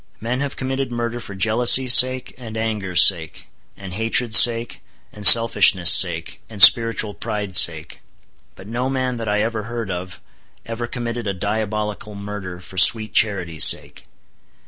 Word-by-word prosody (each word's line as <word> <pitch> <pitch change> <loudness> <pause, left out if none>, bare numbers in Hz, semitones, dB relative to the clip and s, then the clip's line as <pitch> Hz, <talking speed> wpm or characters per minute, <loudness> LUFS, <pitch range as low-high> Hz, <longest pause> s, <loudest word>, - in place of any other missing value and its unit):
Men 120 +3 -6
have 140 -1 -6
committed 130 -1 -6
murder 120 0 -6
for 100 -4 -12
jealousy's 120 +5 +2
sake, 130 0 +1
and 115 -3 -12
anger's 105 -5 -2
sake, 80 -5 -2 0.3
and 95 -2 -12
hatred's 115 +2 -1
sake, 120 0 0 0.3
and 105 -1 +2
selfishness' 105 -6 +5
sake, 85 -3 -1
and 110 -3 -13
spiritual 115 -1 +4
pride's 105 -2 0
sake; 80 -1 -2 0.5
but 95 - -16
no 120 +5 -6
man 130 -2 -5
that 115 -1 -8
ever 105 +1 -4
I - - -13
heard 115 -4 -8
of, 90 +1 -9 0.5
ever 115 +1 -8
committed 120 -2 -8
a 100 - -5
diabolical 105 +1 -7
murder 100 -3 -10
for 90 +1 -8
sweet 110 +1 +3
charity's 90 -7 0
sake. - - -1
110 Hz, 150 wpm, -17 LUFS, 95-120 Hz, 0.5 s, selfishness